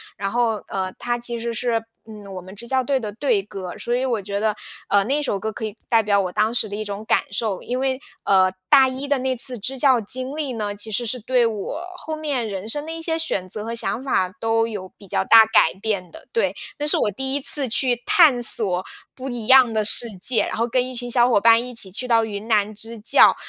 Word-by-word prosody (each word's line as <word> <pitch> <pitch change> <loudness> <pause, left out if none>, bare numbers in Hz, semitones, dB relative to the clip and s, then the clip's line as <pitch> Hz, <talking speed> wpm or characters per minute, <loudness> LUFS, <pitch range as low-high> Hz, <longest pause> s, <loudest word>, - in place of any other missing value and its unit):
然 195 0 -4
后 235 -1 +1
呃， 185 -1 -4
它 240 0 -2
其 235 0 -4
实 230 0 -4
是 230 -1 -1 0.2
嗯， 210 -3 -11
我 185 - -6
们 185 +2 -12
支 235 +3 -10
教 260 -1 +2
队 270 +1 0
的 210 -2 -5
队 220 -3 0
歌。 190 -3 -8
所 240 - -3
以 255 +2 -1
我 235 -5 -1
觉 200 +1 -4
得， 215 0 0 0.3
呃， 200 -1 +3
那 280 +7 -1
首 210 -8 -1
歌 220 +3 -4
可 220 - -6
以 215 - -6
代 230 -1 +4
表 200 -2 +2
我 180 -1 -3
当 215 +4 0
时 220 -2 +1
的 205 - -5
一 215 - -4
种 205 +1 -6
感 - - +2
受。 205 -3 -2
因 250 +1 -4
为 265 0 -1 0.2
呃， 190 -1 +4 0.2
大 265 -1 +6
一 260 +2 -5
的 285 - +2
那 260 0 -1
次 245 -1 0
支 265 +6 -3
教 260 -2 +4
经 255 +6 -5
历 280 -5 -3
呢， 210 -2 -3
其 205 +2 -5
实 240 +4 -1
是 250 +3 -3
对 245 +1 +1
我 225 - -4
后 315 -2 -6
面 285 -7 -3
人 200 +1 -6
生 295 +5 -4
的 320 - -6
一 330 - -7
些 325 0 0
选 195 - -2
择 210 +3 -6
和 230 - -4
想 230 +1 -2
法 225 -9 0
都 225 0 +1
有 205 -4 -6
比 200 - -15
较 190 - -1
大 225 +1 +8
改 220 - +3
变 195 -5 -2
的。 - - -14
对， 465 - 0 0.2
那 295 - -1
是 - - +3
我 210 - +1
第 265 +6 -1
1 285 - -2
次 275 0 +8
去 245 +1 +1
探 325 -12 +5
索 195 -6 +1 0.3
不 265 +1 -7
一 240 -3 -6
样 260 -2 +6
的 215 -1 +1
世 230 +2 +5
界， 235 +5 +1
然 - - -4
后 230 - +1
跟 250 +1 0
一 255 - -8
群 245 0 -4
小 240 0 +4
伙 230 - +3
伴 230 +1 +6
一 250 0 -8
起 195 -4 +2
去 250 +7 -1
到 230 -2 +3
云 210 0 -6
南 215 -2 +1
支 225 +2 -5
教， 210 - +5
230 Hz, 270 characters per minute, -21 LUFS, 205-255 Hz, 0.3 s, 大